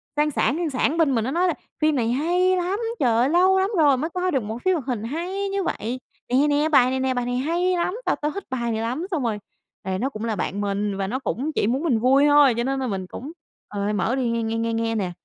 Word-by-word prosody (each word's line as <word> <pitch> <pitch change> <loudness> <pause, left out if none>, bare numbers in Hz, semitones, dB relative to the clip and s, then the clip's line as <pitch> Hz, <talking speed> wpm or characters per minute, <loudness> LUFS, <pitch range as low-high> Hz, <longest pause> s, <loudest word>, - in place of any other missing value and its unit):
sang 300 0 +2
sảng, 285 - +1
sang 345 -2 -1
sảng 285 +3 0
bên 300 -6 +3
mình, 225 - +1
nó 260 - -2
nói 355 +3 +2
là: 350 - +1 0.3
"Phim 310 -1 +3
này 235 -3 0
hay 355 +7 +2
lắm. 365 +3 -1 0.2
Trời 250 -4 +3
ơi, 245 +3 +3
lâu 370 +4 +4
lắm 380 +1 +1
rồi 290 -4 +5
mới 310 +6 -2
coi 365 +1 -1
được 265 -7 0
một 220 +2 -5
phim 375 - +4
hoạt 295 -7 -4
hình 240 -5 -2
hay 360 - -3
như 395 -1 -1
vậy. 245 -3 -3 0.3
Nè, 270 +4 +3
nè, 295 +2 +2
bài 255 -5 +5
này 260 0 -1
nè, 260 0 0
bài 245 -1 -2
này 245 0 -1
hay 345 +7 0
lắm, 355 +3 -1
tao - - +2
tao 300 +1 -2
thích 400 +5 -6
bài 235 -3 -2
này 220 0 -2
lắm." 250 +9 -2
Xong 310 -6 -1
rồi, 220 -3 -1 0.4
tại 190 0 -2
nó 265 - 0
cũng 220 -4 -6
là 225 -2 -1
bạn 200 +2 -3
mình 200 0 -1
và 195 -1 -2
nó 255 +6 -2
cũng 275 +2 -2
chỉ - - +1
muốn 260 +6 0
mình 260 -10 +2
vui 265 +4 +4
thôi, 290 -3 +6
cho 235 - 0
nên 270 +2 -1
là 260 - -2
mình 190 -4 -3
cũng, 270 +10 -8 0.4
ờ, 205 0 -2
mở 210 +5 0
đi, 255 -3 0
nghe, 230 0 -1
nghe, 225 0 -2
nghe, 230 0 -1
nghe 225 0 -1
nè. 190 -5 -1
265 Hz, 285 wpm, -23 LUFS, 230-320 Hz, 0.4 s, thôi